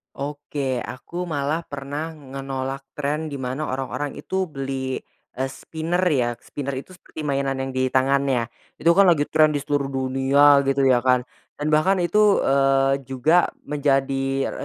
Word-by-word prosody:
Oke, 140 -3 -3
aku 170 +7 -6
malah 155 -1 -1
pernah 145 +2 -5
ngenolak 135 -2 -5 0.2
trend 150 +2 -2
di 140 - -5
mana 130 +4 -3
orang-orang 135 +2 -4
itu 190 0 -2
beli, 135 -2 -3 0.4
eee, 130 - 0
spinner 160 +6 -3
ya 120 -5 +1
spinner 140 +3 -6
itu 135 +7 -7
seperti 160 - -9
mainan 140 -2 0
yang 135 - -3
di 130 0 0
tangan 135 +1 +3
ya 130 -3 +1 0.3
itu 165 - +2
kan 195 +3 +6
lagi 165 -4 +4
tren 155 -1 +4
di 145 - -1
seluruh 145 -1 0
dunia 135 +2 +4
gitu 135 0 +2
ya 130 -2 +5
kan, 125 0 +2 0.3
dan 150 +1 -2
bahkan 155 +6 +4
itu, 205 +4 +4
eee, 135 0 +3
juga 145 +7 +3 0.2
menjadi 135 -2 0
140 Hz, 155 wpm, -23 LUFS, 135-150 Hz, 0.4 s, kan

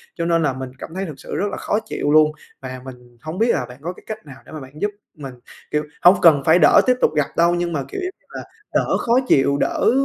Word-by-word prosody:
cho 170 - -3
nên 165 -1 +2
là 145 -4 +1
mình 130 0 -7
cảm - - -8
thấy 190 +1 -3
thực 155 -6 -9
sự - - -7
rất 200 - 0
là - - -5
khó 210 - -1
chịu 145 -9 -2
luôn 155 0 +5 0.3
và 130 -1 -7
mình 125 -2 -13
hông 155 +5 -6
biết 230 - +2
là 125 - -1
bạn 125 +1 -12
có 175 +3 -4
cái - - -18
cách 215 -6 -7
nào 135 -3 -12
để - - -15
mà 155 - -7
bạn 135 +3 -12
giúp 205 - 0 0.3
mình, 135 -3 -8 0.4
kiểu, 150 0 0 0.2
hông 180 +2 +7
cần 150 -5 +6
phải 165 +3 +5
đỡ 155 - +6
tiếp 250 - +4
tục - - +3
gặp 150 -2 +1
đâu 170 +1 +3
nhưng 175 -1 -2
mà, 140 - -2
kiểu, 390 - -5
giống 370 - -3
như - - -39
là, - - -7 0.3
đỡ - - +1
khó 235 - 0
chịu, 140 - +3
đỡ - - +1
155 Hz, 280 wpm, -20 LUFS, 135-175 Hz, 0.4 s, hông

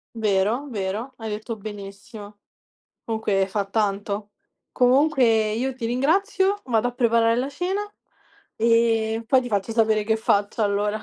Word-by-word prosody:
Vero, 220 +6 0
vero, 210 +5 -4
hai 225 -1 -6
detto 215 +2 -5
benissimo. 205 +1 -10 0.7
Comunque 210 -4 0
fa 200 +1 -1
tanto. 205 0 -2 0.4
Comunque 250 -5 +3
io 255 +4 -2
ti 235 -3 -4
ringrazio, 380 - +1
vado 235 0 +1
a - - -6
preparare 230 -1 +2
la 260 +3 -1
cena 360 +7 -2 0.8
e 225 -1 +2
poi 260 +1 +4
ti 245 - -6
faccio 205 +1 -1
sapere 220 -2 +2
che 220 0 +1
faccio 205 0 0
allora. 205 +1 0
225 Hz, 135 wpm, -23 LUFS, 205-245 Hz, 0.8 s, poi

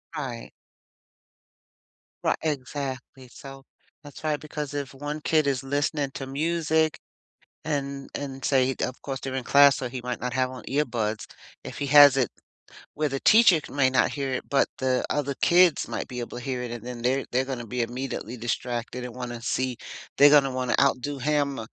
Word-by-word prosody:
Right. 125 -5 -5 1.7
Ri - - +3
exactly, 135 -3 -4
so 135 +2 -12 0.4
that's 145 +1 -12
right, 155 -1 0
because 150 -1 -6
if 140 -2 -4
one 145 +2 -5
kid 155 0 +2
is 135 -2 0
listening 145 +1 -1
to 135 - -5
music, 160 +2 0 0.7
and 140 -2 -3
and 135 -1 -6
say 130 -1 +2
of 125 - -3
course, 135 -1 -5
they're 135 -1 -5
in 130 -2 -3
class, 140 0 +6
so 125 - -4
he 130 0 -5
might 125 0 -4
not 125 0 -2
have 130 0 0
on 130 -1 -10
earbuds. 120 -6 -1 0.4
If - - -8
he - - -2
has 145 -1 +8
it 130 -3 +1 0.6
where 150 0 0
the 135 -1 -3
teacher 215 -6 +6
c - - -12
may 135 -2 +3
not 130 - +2
hear 140 -2 -3
it, 125 - -5
but 140 - +2
the 130 -1 0
other 145 -1 -1
kids 175 -2 +4
might - - -4
be 125 -2 -6
able 120 0 -6
to 125 - -9
hear 125 -2 -3
it, 120 - -5
and 120 -1 -7
then 125 -1 -6
they're 130 +3 +1
they're 130 +2 +2
gonna 130 -3 -5
be 125 +2 -2
immediately 125 0 -4
distracted 120 +1 -3
and 125 - -6
wanna 120 -2 -6
see 130 0 -1 0.4
they're 145 +1 +8
gonna 140 -2 +5
wanna 125 -2 0
outdo 140 +1 +1
him, 145 0 0
135 Hz, 185 wpm, -26 LUFS, 125-145 Hz, 1.7 s, has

